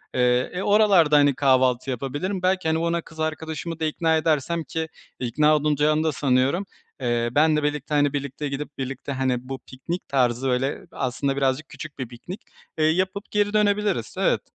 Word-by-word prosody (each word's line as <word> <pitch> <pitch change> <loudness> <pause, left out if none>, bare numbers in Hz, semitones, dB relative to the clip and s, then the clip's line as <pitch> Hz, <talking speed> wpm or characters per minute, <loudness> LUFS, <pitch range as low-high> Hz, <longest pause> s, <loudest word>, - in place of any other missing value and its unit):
Eee, 125 0 +2
e, 180 - -3
oralarda, 200 -8 +5
hani, 145 -2 +4
kahvaltı 130 -1 +2
yapabilirim. 145 - -3
Belki, 185 -1 +1
hani, 160 0 +2
ona 170 +1 0
kız 160 -1 -15
arkadaşımı 160 +1 -3
da 160 - 0
ikna 160 +1 +1
edersem 160 +1 0
ki 160 +3 -3 0.3
ikna 150 +5 +3
olunacağını 150 +1 +2
da 160 - +1
sanıyorum, 140 +6 +1 0.4
eee, 120 -1 0
benle 150 +2 +3
birlikte, 150 0 -2
hani, 145 -1 +3
birlikte 140 +1 -3
gidip, 145 +1 -6
birlikte, 135 +1 -5
hani, 130 -1 -1
bu 135 -1 -4
piknik 165 +8 -6
tarzı, 125 -1 +1
böyle, 130 +2 0
aslında 135 +2 -2
birazcık 135 +2 0
küçük 155 -3 -9
bir 130 - -3
piknik, 150 - -9 0.4
eee, 155 - +2
yapıp 185 +5 0
geri 205 0 +1
dönebiliriz. 205 - +1
Evet. - - +2
150 Hz, 170 wpm, -24 LUFS, 130-165 Hz, 0.4 s, oralarda